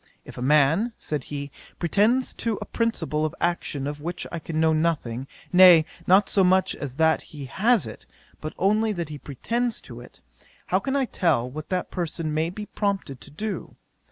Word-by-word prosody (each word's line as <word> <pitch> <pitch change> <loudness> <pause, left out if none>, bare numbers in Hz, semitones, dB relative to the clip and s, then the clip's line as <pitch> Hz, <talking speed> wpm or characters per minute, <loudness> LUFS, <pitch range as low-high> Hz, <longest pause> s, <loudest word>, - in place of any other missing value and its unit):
"If - - -11
a - - -7
man 150 - +3
(said 150 -4 -4
he,) 140 -1 -6 0.3
pretends 215 +9 +2
to 225 -3 -2
a - - -5
principle 170 -10 -1
of 155 - -2
action 170 -5 -1
of 145 +1 -5
which 170 +2 -4
I 170 - -4
can 155 0 -4
know 160 0 +4
nothing, 145 -6 -1 0.3
nay, 180 -3 +8 0.2
not 190 +2 +5
so 195 - +3
much 185 +1 +3
as 135 -3 -6
that 160 +1 +3
he 145 -3 -9
has 215 - +2
it, - - -10 0.3
but 155 - -6
only 215 +3 +2
that 170 -5 -4
he 150 -1 -7
pretends 230 - -2
to 120 -2 -10
it; 125 - -14 0.5
how 185 - +1
can 265 +8 -2
I 275 -1 +2
tell 145 - +1
what 150 +4 -8
that 180 -1 -2
person 165 -3 -3
may 160 +2 0
be 210 +4 -7
prompted 195 - -3
to - - -11
do? 205 +8 -5
165 Hz, 190 wpm, -25 LUFS, 150-200 Hz, 0.5 s, nay